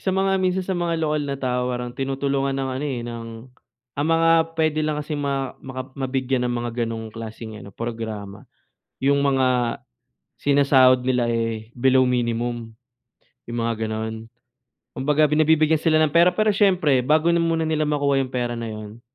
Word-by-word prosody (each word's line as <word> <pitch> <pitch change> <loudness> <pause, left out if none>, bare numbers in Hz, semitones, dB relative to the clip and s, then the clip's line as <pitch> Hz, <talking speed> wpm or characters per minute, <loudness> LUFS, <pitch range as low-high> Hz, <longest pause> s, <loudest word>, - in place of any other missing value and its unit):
Sa - - -4
mga 195 0 +2
minsan 185 0 0
sa 190 - -2
mga 175 -2 -1
lokal 155 -2 0
na 140 - -2
tao 125 -2 -1
parang 125 -1 -4
tinutulungan 135 +1 -1
ng 135 -1 -2
ano, 130 +3 -3
eh, 130 -3 -3
ng 115 -1 -6 0.6
ang 145 +5 -2
mga 165 0 +3 0.3
puwede 155 -1 +1
lang 155 -1 -1
kasi 150 +1 -6
ma 140 -3 -2
maka 130 0 -7
mabigyan 130 -1 -1
ng 120 - -1
mga 120 0 -3
ganung 110 -1 -6
klaseng 110 -1 -8
ano, - - -10
programa, 110 -3 -6 0.6
'yong 140 +1 +3
mga 130 -3 +1 0.6
sinasahod 135 -3 +5
nila, 125 -2 +1
eh, 115 -1 -3
below 130 +1 +3
minimum, 120 -2 -2 0.7
'yong 120 0 -4
mga 115 0 0
gano'n. 110 0 -4 0.7
Kumbaga, 150 +3 +2
binibibigyan 155 +1 +3
sila 160 -1 +2
ng 155 -2 +1
pera. 170 +2 +6
Pero 215 0 +3
siyempre, 180 -9 +3
bago 155 +6 +2
na 170 - +3
muna 165 -1 +1
nila 155 -1 0
makuha 140 -2 +1
'yong 130 - -2
pera 120 -1 -1
na 115 -1 -4
'yon, 110 +1 -8
135 Hz, 170 wpm, -23 LUFS, 120-155 Hz, 0.7 s, pera